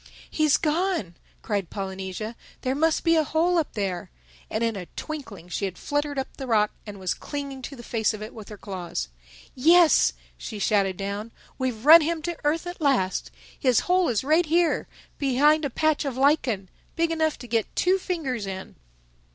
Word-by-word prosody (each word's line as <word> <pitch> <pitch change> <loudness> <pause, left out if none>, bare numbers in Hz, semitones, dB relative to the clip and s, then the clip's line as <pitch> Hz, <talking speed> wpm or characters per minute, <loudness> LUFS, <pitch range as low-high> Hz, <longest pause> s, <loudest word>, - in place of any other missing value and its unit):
"He's 305 -2 +3
gone," 315 - 0 0.3
cried 200 -5 -2
Polynesia. 195 +3 -5 0.3
"There 255 - 0
must 315 +3 +1
be 330 0 +4
a 315 - +4
hole 335 +4 +2
up 315 - -2
there." 195 -4 -3 0.4
And 220 - -1
in 230 -1 0
a 180 -3 -6
twinkling 245 - -7
she 190 +3 -2
had 185 -2 -5
fluttered 290 0 -2
up 265 - -4
the 265 - -6
rock 210 -3 +3 0.2
and 200 -1 -8
was 185 -2 -1
clinging 280 -2 -6
to 275 +2 -7
the 240 - -11
face 225 -2 0
of 215 -1 -6
it 215 - -8
with 215 -2 -10
her 210 - -8
claws. 185 - -5 0.4
"Yes," 330 +5 +5 0.3
she 215 - -6
shouted 195 -2 +1
down, 200 +3 -4 0.3
"we've 255 -3 -2
run 325 +3 +10
him 320 0 -1
to 345 -1 -3
earth 310 +4 +1
at 350 0 -7
last. 255 -11 +1 0.3
His 255 -4 +3
hole 360 -1 +2
is 230 -2 0
right 315 +4 +3
here, 335 +2 +2 0.3
behind 295 +3 +3
a - - 0
patch 310 +4 +1
of 270 -3 -3
lichen—big 275 - 0
enough 315 -1 +1
to - - -10
get 225 -2 -1
two 370 +2 +3
fingers 270 - -3
in." 190 0 -7
265 Hz, 185 wpm, -25 LUFS, 205-315 Hz, 0.4 s, run